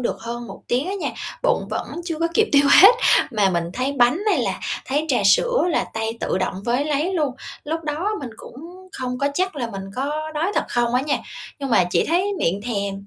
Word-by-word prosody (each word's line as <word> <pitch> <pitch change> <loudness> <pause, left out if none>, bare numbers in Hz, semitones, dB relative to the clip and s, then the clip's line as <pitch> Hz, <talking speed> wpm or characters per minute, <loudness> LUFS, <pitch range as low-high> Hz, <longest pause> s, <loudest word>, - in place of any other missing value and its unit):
được - - -1
hơn 235 +1 -6
1 195 - -10
tiếng 255 +7 0
á 395 - -2
nha, 395 - -2 0.3
bụng - - +1
vẫn - - -4
chưa 335 -3 -3
có 335 - +2
kịp 440 +3 +3
tiêu 280 0 +6 0.2
hết, 440 +5 +10 0.4
mà 205 -4 +2
mình 170 -1 0
thấy 255 +5 -1
bánh 250 +4 +3
hay - - +2
là - - -2 0.3
thấy 290 +4 0
trà 260 - +2
sữa - - +4
là 330 - +1
tay 225 +1 -2
tự 185 - -1
động 185 0 -1
với 245 +4 +1
lấy 305 +5 0
luôn. 295 -6 0 0.3
Lúc 325 +2 -3
đó 305 +6 -2
mình 255 - -6
cũng - - -12 0.4
không 250 -7 -4
có 280 - +1
chắc 370 -1 -1
là 245 -4 -2
mình 195 -2 -6
có 300 +4 -2
đói 335 +7 0
thật - - +1
không 240 0 0
á 250 - +3
nha 290 0 0 0.4
nhưng 275 -2 -4
mà 185 -6 +4
chỉ - - +2
thấy 370 +5 +1
miệng 195 - 0
thèm 200 -3 -3
275 Hz, 230 wpm, -22 LUFS, 235-325 Hz, 0.4 s, hết